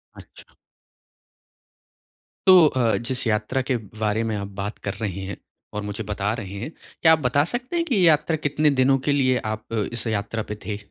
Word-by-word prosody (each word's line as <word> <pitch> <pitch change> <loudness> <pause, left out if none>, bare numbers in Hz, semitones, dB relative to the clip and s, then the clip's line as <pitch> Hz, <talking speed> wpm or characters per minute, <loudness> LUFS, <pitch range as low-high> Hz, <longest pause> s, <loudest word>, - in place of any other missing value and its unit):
अच्छा। - - -15 1.9
तो 185 -3 +9
अ, 125 -5 +1
जिस 130 +2 -3
यात्रा 110 +4 0
के 130 0 -1 0.2
बारे 110 +1 0
में 110 -1 -2
आप 100 0 -4
बात 100 +2 -4
कर 100 - -1
रहे 100 -3 -3
हैं 100 - -6 0.4
और 105 - -3
मुझे 105 +2 -4
बता 105 0 -1
रहे 100 -4 -6
हैं, 120 +9 -5 0.3
क्या 160 - +7
आप 160 - +3
बता 140 +1 +2
सकते 250 +7 -3
हैं 335 -1 +1
की 275 -8 0
ये 195 - +3
यात्रा 160 +1 +3
कितने 150 0 +1
दिनों 135 +1 +4
के - - +4
लिए 130 -2 +2
आप 110 0 -6 0.3
इस 120 - -3
यात्रा 110 +1 -2
पे - - -2
थे? 105 0 -3
115 Hz, 195 wpm, -23 LUFS, 105-145 Hz, 1.9 s, तो